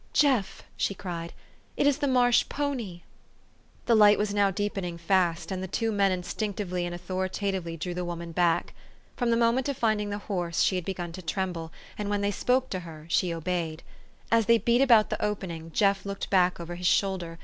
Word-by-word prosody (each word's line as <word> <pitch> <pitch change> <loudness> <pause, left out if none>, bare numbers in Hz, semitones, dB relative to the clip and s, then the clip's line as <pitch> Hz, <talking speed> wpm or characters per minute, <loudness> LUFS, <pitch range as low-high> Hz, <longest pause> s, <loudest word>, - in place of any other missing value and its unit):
" - - -34
Jeff! 255 -9 0
" - - -36
she 200 - 0
cried, 175 -2 -5 0.2
" - - -34
it - - +2
is 285 0 +3
the 285 - 0
marsh 245 -2 +4
pony! 245 -12 -3 0.4
" - - -34
The 235 - +3
light 210 -2 +7
was 210 -1 -1
now 200 -1 +3
deepening 195 -3 -3
fast, 170 0 +1
and 185 -1 -3
the 190 - -4
two 225 +4 -1
men 200 -2 +2
instinctively 185 0 -3
and 175 - -5
authoritatively 185 -1 -3
drew 175 +3 -4
the 180 +1 -3
woman 170 -1 -5
back. 170 0 +1 0.4
From 245 -2 0
the 230 - +3
moment 235 +3 +2
of 275 - -2
finding 215 -2 +1
the 205 - -3
horse, 180 -5 -2
she 190 - +2
had 180 -2 -2
begun 175 -3 -4
to 185 +2 -8
tremble, 170 -2 -3 0.3
and 205 -1 -2
when 205 0 0
they 200 0 +1
spoke 255 +5 0
to 185 - -2
her 160 -3 -10
she 175 +1 +2
obeyed. 165 -1 -3 0.5
As 230 -2 +3
they 230 - +6
beat 235 +2 +2
about 235 -6 +5
the - - -2
opening, 180 -6 -3
Jeff 195 +1 +2
looked 200 0 -5
back 180 -2 +3
over 170 0 -6
his 180 +1 -2
shoulder. 185 -5 0
190 Hz, 210 wpm, -27 LUFS, 175-210 Hz, 0.5 s, light